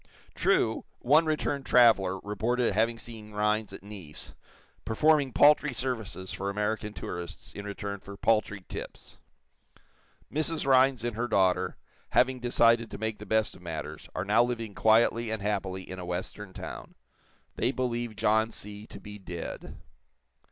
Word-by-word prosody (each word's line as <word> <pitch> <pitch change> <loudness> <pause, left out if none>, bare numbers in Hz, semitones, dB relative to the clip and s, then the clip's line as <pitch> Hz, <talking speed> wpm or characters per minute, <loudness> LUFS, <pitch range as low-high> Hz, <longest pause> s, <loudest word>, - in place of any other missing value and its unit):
True, - - +2 0.2
one 155 +5 +5
returned 145 -2 0
traveler 105 -6 +5
reported 115 +3 0
having 115 +3 +2
seen 110 -2 -10
Rhinds 105 0 0
at 100 - -9
Nice, 95 -7 -7 0.5
performing 145 +4 +3
paltry 145 0 +5
services 110 -8 -4
for 100 +1 -3
American 105 +1 -1
tourists 90 -3 -7
in 100 - -7
return 100 0 -5
for 100 +1 -10
paltry 105 -3 +1
"tips." - - -8 1.1
Mrs. 155 +1 0
Rhinds 130 -2 +4
and 120 -2 -2
her 120 +2 -1
daughter, 95 -5 +2 0.4
having 130 0 +3
decided 115 -1 +3
to - - -7
make 110 0 -3
the 105 - -9
best 110 +1 +1
of - - -15
matters, 80 -3 -6
are 90 - -2
now 105 +4 +4
living 115 -3 -3
quietly 115 +2 +3
and 110 -2 -3
happily 95 -2 -2
in 95 0 -7
a 90 - -6
western 95 +3 -4
town. - - -8 0.6
They 125 - +1
believe 120 -3 -2
John 110 +2 +2
C. 105 -1 -7
to - - -10
be 105 0 -10
dead. 90 -3 -7
110 Hz, 150 wpm, -29 LUFS, 100-120 Hz, 1.1 s, one